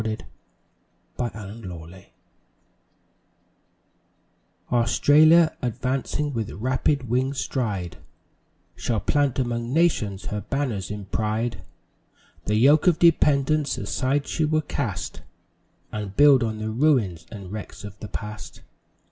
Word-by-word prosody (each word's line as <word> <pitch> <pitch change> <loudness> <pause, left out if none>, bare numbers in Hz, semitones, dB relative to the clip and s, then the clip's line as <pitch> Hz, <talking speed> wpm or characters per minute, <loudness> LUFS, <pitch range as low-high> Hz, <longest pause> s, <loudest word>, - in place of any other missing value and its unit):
The 110 0 -3 1.0
Far 120 - -2
Future 95 -5 -10 2.6
Australia, 155 +7 +5
advancing 130 +4 -2
with 115 -4 -2
rapid 130 +4 0
winged 130 +4 0
stride, 100 - -2 0.8
Shall 105 +5 -1
plant 145 0 +1
among 120 -2 -2
nations 130 - +1
her 105 0 -3
banners 115 -6 -2
in 105 -1 -6
pride, 110 +1 -2 0.8
The 105 - 0
yoke 140 +9 +5
of 175 -3 +5
dependence 150 -3 +3
aside 140 +2 -1
she 160 - -1
will 155 0 +2
cast, 120 - -4 0.7
And 105 -2 -6
build 145 -2 +7
on 110 -2 -1
the 110 0 -3
ruins 110 - +1
and 100 -4 -9
wrecks 105 0 -7
of 105 -1 -9
the 105 - -7
Past. 105 +1 -7
120 Hz, 110 wpm, -24 LUFS, 105-140 Hz, 2.6 s, build